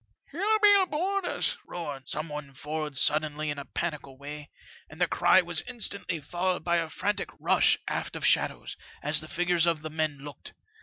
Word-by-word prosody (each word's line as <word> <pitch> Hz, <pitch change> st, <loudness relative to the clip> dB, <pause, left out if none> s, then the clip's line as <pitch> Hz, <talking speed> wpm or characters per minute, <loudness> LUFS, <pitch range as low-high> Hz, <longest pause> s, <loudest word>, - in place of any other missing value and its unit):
" -, -, -54 dB
' -, -, -26 dB
It'll 415 Hz, +7 st, +2 dB
be 410 Hz, -1 st, +7 dB
aboard 370 Hz, +3 st, -1 dB
us! -, -, 0 dB
' -, -, -34 dB
roared 145 Hz, -6 st, -6 dB
some 155 Hz, +2 st, -3 dB
one 150 Hz, -3 st, -7 dB
forward 150 Hz, 0 st, -4 dB
suddenly 150 Hz, +1 st, +3 dB
in 145 Hz, -, -5 dB
a 140 Hz, -, -7 dB
panical 145 Hz, -6 st, -5 dB
way, 145 Hz, +1 st, -8 dB, 0.4 s
and 155 Hz, -, -13 dB
the 180 Hz, -, +4 dB
cry 175 Hz, +2 st, +4 dB
was 170 Hz, -2 st, +1 dB
instantly 200 Hz, -8 st, -1 dB
followed 180 Hz, +5 st, -2 dB
by 170 Hz, 0 st, +2 dB
a 165 Hz, -1 st, -1 dB
frantic 200 Hz, +4 st, -2 dB
rush -, -, +4 dB
aft -, -, -3 dB
of -, -, -2 dB
shadows, -, -, +2 dB, 0.3 s
as 150 Hz, +1 st, +2 dB
the 155 Hz, -, -9 dB
figures 175 Hz, 0 st, +1 dB
of 165 Hz, -2 st, +1 dB
the 155 Hz, -, -5 dB
men 155 Hz, -2 st, -1 dB
looked. 140 Hz, -1 st, -10 dB
160 Hz, 200 wpm, -28 LUFS, 150-180 Hz, 0.4 s, be